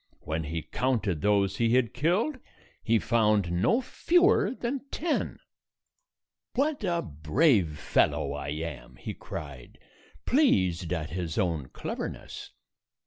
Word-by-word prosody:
When 80 +1 -3
he 80 +1 -3
counted 110 - -1
those 100 -2 +2
he 115 0 +3
had 125 -4 +2
killed, 195 - +1 0.4
he 115 -1 +3
found 105 -5 +2
no 95 - +2
fewer 355 - +3
than 255 +2 -3
ten. 325 -1 -1 1.2
"What 280 -1 0
a 170 -3 0
brave 80 - +2
fellow 70 -1 +1
I 70 -1 -5
am!" 75 -2 -5
he - - -6
cried, 70 -5 -8 0.5
pleased 95 - +2
at 80 -4 -2
his 85 -2 -3
own 85 -8 0
cleverness. - - -6
100 Hz, 120 wpm, -28 LUFS, -, 1.2 s, he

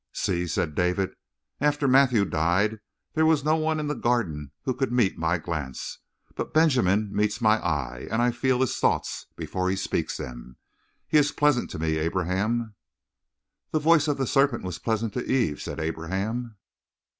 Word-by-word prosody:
"See," 85 0 -1
said 80 -1 -1
David. 90 +4 0 0.5
"After 145 -1 +1
Matthew 130 -5 +5
died 90 +6 +1 0.3
there 160 - +2
was 160 -3 +3
no 155 +1 +4
one 155 0 0
in 150 - -2
the 150 - -1
Garden 100 - -1
who 130 - 0
could 135 0 -1
meet 120 -6 +2
my 85 +2 +1
glance. 80 -6 -5 0.3
But - - -5
Benjamin 110 - +3
meets 105 +1 +1
my 110 -2 +4
eye 65 -7 -2
and 110 - 0
I 120 +1 +3
feel 130 +1 +1
his 130 - +1
thoughts - - 0
before 95 0 -2
he 95 - +1
speaks 95 - -2
them. 60 0 -8 0.5
He 155 - +5
is 145 0 +2
pleasant 150 -4 +2
to - - -6
me, 80 0 0
Abraham." 95 +7 -1 1.0
"The - - 0
voice 155 0 +4
of 145 - +1
the 135 - 0
serpent 135 +3 +2
was 90 -3 -5
pleasant 110 -2 -1
to - - -3
Eve," 120 - +1
said - - -5
Abraham. 95 +9 -3
110 Hz, 170 wpm, -26 LUFS, 85-135 Hz, 1.0 s, Matthew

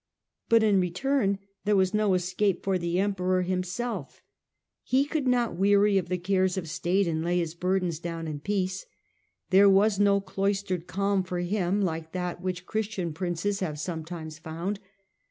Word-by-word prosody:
But 230 -1 +5
in 205 -3 +4
return 200 +4 +1 0.3
there 210 0 +2
was 190 0 +2
no 210 -3 +3
escape 185 +2 0
for 190 -1 +1
the 170 0 -1
Emperor 185 -2 +1
himself. 185 +6 -3 0.6
He 265 +2 +2
could 290 -2 -2
not 245 -5 +2
weary 200 +1 +4
of 180 -2 -6
the 180 - 0
cares 185 +1 +1
of 175 -3 -3
state 180 +5 +1
and 160 -1 -1
lay 175 +1 +1
his 165 -2 -1
burden 180 +1 0
down 165 -1 -4
in 150 -2 -4
peace. 190 +2 -2 0.6
There 195 +2 +7
was 200 +1 +4
no 200 -1 +4
cloistered 195 -2 -2
calm 200 0 +1
for 185 -1 -4
him 190 +1 0
like 160 -2 -3
that 180 -1 -3
which 180 -1 -3
Christian 205 -6 -2
princes 180 +4 -2
have 155 -6 -3
sometimes 160 -1 -5
found. 170 +6 -4
185 Hz, 165 wpm, -27 LUFS, 175-200 Hz, 0.6 s, There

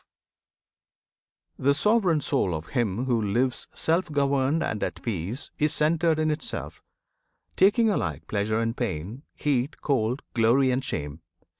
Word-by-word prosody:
[FN#10] - - -9
The 140 - +6
sovereign 190 -4 +2
soul 100 - 0
Of 80 +1 -6
him 120 -2 -1
who 120 -3 +1
lives 120 +5 0
self 165 +1 +1
governed 140 +1 +1
and 105 - -3
at - - -4
peace 105 +2 -3
Is 150 0 +2
centred 160 +1 +2
in 155 0 +1
itself, 150 - -5 0.7
taking 210 +4 +4
alike 80 - -2
Pleasure 110 +1 -1
and 115 0 -1
pain; 105 - -4
heat, 140 -1 -1
cold; 125 -2 0
glory 125 +3 +3
and 130 +1 0
shame. 75 - -5
130 Hz, 140 wpm, -26 LUFS, 110-150 Hz, 0.7 s, The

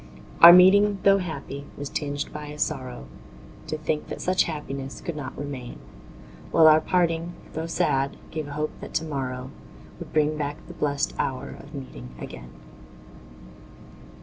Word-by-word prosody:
Our 170 - +13
meeting, 200 +3 +7
tho' 195 0 +6
happy, 145 -5 -6
was 145 - -4
tinged 145 0 -3
by 150 0 -6
a 150 0 -8
sorrow 130 - -3 0.6
To 155 - -3
think 155 0 -2
that - - -6
such 185 +1 +2
happiness 135 - -5
could 170 - -5
not 140 -3 -6
remain; 135 -4 -6 0.7
While 165 - +5
our 155 0 +7
parting, 170 -1 0 0.2
tho' 160 +1 -3
sad, 135 -4 0
gave 155 -2 -4
a 145 - -7
hope 150 +1 -2
that - - -9
to 160 - 0
morrow 130 -3 -4 0.5
Would - - -9
bring 155 0 +2
back 145 0 -3
the - - -9
blest 145 +2 -1
hour 130 -1 -2
of 145 +2 -11
meeting 130 - -9
again. - - -9
150 Hz, 155 wpm, -25 LUFS, 135-165 Hz, 0.7 s, Our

